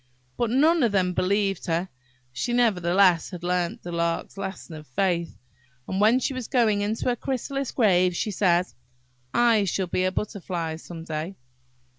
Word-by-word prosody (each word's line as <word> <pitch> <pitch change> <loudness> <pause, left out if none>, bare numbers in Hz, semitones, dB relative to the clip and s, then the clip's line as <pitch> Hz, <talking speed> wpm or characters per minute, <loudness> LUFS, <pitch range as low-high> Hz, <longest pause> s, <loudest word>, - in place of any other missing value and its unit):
But 240 -2 0
none 305 +7 +4
of 235 -4 +3
them 185 -2 +1
believed 195 +2 0
her. 170 +2 0 0.5
She 240 - -2
nevertheless 185 -6 +3
had 180 -3 -8
learnt 180 -1 -1
the 175 - -6
Lark's 170 0 -2
lesson 195 -3 -6
of 155 -1 -10
faith, 170 - -1 0.5
and 190 +1 -1
when 220 +4 +5
she 265 +1 -1
was 255 -3 -5
going 225 -6 +2
into 210 +2 -2
her 245 - +2
chrysalis 270 +2 -3
grave, 185 -6 +3
she 210 - -1
said–"I 170 - 0
shall 190 +1 -1
be 180 +1 -1
a 185 - +1
Butterfly 180 -6 -3
some 165 0 -9
day!" 160 +3 -4
190 Hz, 160 wpm, -25 LUFS, 170-220 Hz, 0.5 s, when